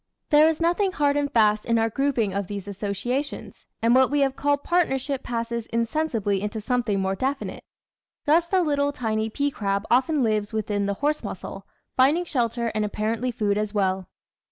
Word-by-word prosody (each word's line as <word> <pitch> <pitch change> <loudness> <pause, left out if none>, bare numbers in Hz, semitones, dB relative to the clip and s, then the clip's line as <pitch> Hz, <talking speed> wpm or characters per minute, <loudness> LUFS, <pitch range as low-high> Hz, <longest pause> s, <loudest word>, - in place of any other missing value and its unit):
There 300 +1 +7
is 320 -1 0
noth 340 +2 +1
ing 390 -2 +1
hard 285 -1 +2
and 290 -1 0
fast 215 -4 +3
in 230 -1 +1
our 225 0 +2
grouping 250 -6 0
of 200 -1 -2
these 200 -1 -6
associations, 205 +8 -4 0.2
and 230 +1 +4
what 260 0 +5
we 290 0 +1
have 270 -1 +1
called 285 0 0
partnership 280 -6 0
passes 235 -2 -3
insensibly 230 -4 -1
into 210 +2 -3
something 225 -3 0
more 190 0 0
definite. 270 +7 -3 0.6
Thus 330 +3 +4
the 370 0 +2
little 285 -2 +1
tiny 220 -5 -2
pea 285 +6 -1
crab 200 -3 -2
often 270 +3 +3
lives 215 -1 0
within 205 -2 -1
the 200 - -1
horse 300 +1 +1
mussel, - - -7 0.3
finding 290 +7 +3
shelter 235 -5 -1
and 215 -1 0
apparently 220 +4 -1
food 210 -3 0
as 215 0 -3
well. 190 -2 0
235 Hz, 180 wpm, -25 LUFS, 210-285 Hz, 0.6 s, There